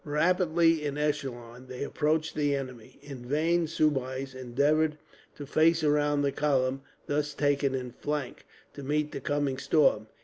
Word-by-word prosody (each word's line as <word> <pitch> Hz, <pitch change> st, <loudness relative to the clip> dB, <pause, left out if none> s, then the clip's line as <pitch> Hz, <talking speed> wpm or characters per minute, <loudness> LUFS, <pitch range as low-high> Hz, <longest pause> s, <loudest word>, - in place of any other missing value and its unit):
Rapidly, 165 Hz, +1 st, +2 dB
in 145 Hz, -1 st, -3 dB
echelon, 130 Hz, -5 st, -3 dB
they 125 Hz, +1 st, -5 dB
approached 155 Hz, +2 st, 0 dB
the 145 Hz, -2 st, +1 dB
enemy. 130 Hz, -4 st, -7 dB
In 135 Hz, -4 st, -9 dB
vain 160 Hz, +6 st, +1 dB
Soubise 135 Hz, -4 st, -1 dB
endeavoured 145 Hz, +5 st, +1 dB, 0.4 s
to 145 Hz, -, -8 dB
face 160 Hz, +3 st, +3 dB
round 145 Hz, -1 st, +2 dB
the 140 Hz, -, +1 dB
column, 135 Hz, -2 st, 0 dB, 0.2 s
thus 150 Hz, 0 st, -1 dB
taken 140 Hz, -2 st, +1 dB
in 125 Hz, -1 st, -4 dB
flank, 145 Hz, +1 st, -4 dB, 0.3 s
to 140 Hz, -, -9 dB
meet 150 Hz, +2 st, -1 dB
the -, -, -6 dB
coming 145 Hz, -2 st, -1 dB
storm. 140 Hz, -6 st, +2 dB
145 Hz, 145 wpm, -28 LUFS, 130-150 Hz, 0.4 s, face